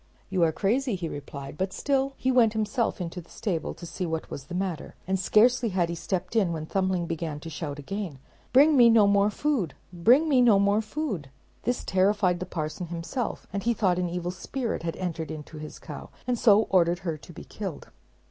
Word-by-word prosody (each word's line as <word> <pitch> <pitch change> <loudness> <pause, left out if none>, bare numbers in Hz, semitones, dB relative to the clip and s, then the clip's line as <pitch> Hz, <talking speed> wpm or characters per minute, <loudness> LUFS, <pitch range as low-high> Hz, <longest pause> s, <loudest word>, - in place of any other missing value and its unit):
"You 185 -2 +1
are 165 -1 +4
crazy," 230 - 0
he 175 -3 -3
replied; 140 -1 -7
but 190 0 0
still 275 +2 0
he 260 - +1
went 235 -4 +4
himself 220 +1 0
into 175 0 -4
The 165 - -21
stable 180 -8 -3
to 170 - -9
see 180 +1 -4
what 160 0 -4
was 135 - -6
the 175 - -7
matter, 180 -4 -3
and 190 +1 0
scarcely 235 +5 +4
had 180 -3 +1
he - - -2
stepped 185 +4 -3
in 195 -6 +3
when 160 -2 -3
Thumbling 185 0 0
began 165 -2 -3
to 165 - -7
shout 150 -1 -4
out - - -10
again, 180 +1 -5 0.3
"Bring 290 +4 +6
me 240 -3 +8
no 225 -2 +6
more 200 0 +4
food, 220 - -1 0.2
bring 245 - +5
me 270 -5 +4
no 230 -5 +6
more 200 +2 +3
food." 215 - -4 0.4
This 245 +1 0
terrified 190 -1 +2
the 185 - -5
parson 160 +2 -4
himself, 175 +9 -4
and 200 - -1
he 235 +3 +1
thought 185 -5 +2
an 180 -1 0
evil 175 0 -3
spirit 230 +6 -3
had 165 0 -3
entered 170 -3 -4
into 155 0 -8
his 155 0 -8
cow, 150 -3 -9 0.2
and 250 0 +1
so 215 -2 +6
ordered 175 -1 +3
her 165 -3 -1
to 170 - -13
be 170 - -10
killed. 195 -7 -7
185 Hz, 215 wpm, -27 LUFS, 165-220 Hz, 0.4 s, me